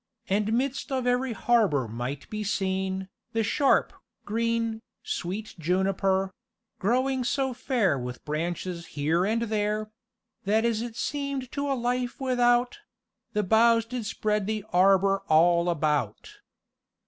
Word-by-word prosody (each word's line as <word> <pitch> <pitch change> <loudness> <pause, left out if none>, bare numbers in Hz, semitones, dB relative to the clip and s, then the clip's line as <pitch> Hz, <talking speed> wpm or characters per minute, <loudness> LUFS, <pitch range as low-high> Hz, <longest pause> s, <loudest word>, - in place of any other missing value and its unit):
And 210 +3 +1
midst 270 +4 -1
of 260 -2 -1
every 250 0 +1
harbour 210 - +2
might 125 +5 -5
be 215 0 -3
seen 190 -1 -1 0.3
The 225 0 +1
sharpe, 275 +6 +2 0.3
green, 230 0 -1 0.2
sweet 200 +5 -4
juniper, 190 +2 +1 0.5
Growing 255 +5 +1
so 265 +1 0
fair 230 - +1
with 125 0 -7
branches 170 +3 -3
here 160 +5 +2
and 230 +2 +1
there, 215 -1 -1 0.5
That 220 +3 +2
as 225 -2 +1
it 235 -1 -5
seemed 280 -2 -3
to 285 0 -2
a 275 - +1
lyf 245 0 -2
without 245 +3 +2 0.5
The 210 - +1
boughs 230 +3 +4
did 235 -2 -4
spread 210 -1 -1
the 215 -1 -2
arbour 195 +1 +4
all 170 +2 +4
about." 150 -9 -1
215 Hz, 130 wpm, -27 LUFS, 185-240 Hz, 0.5 s, boughs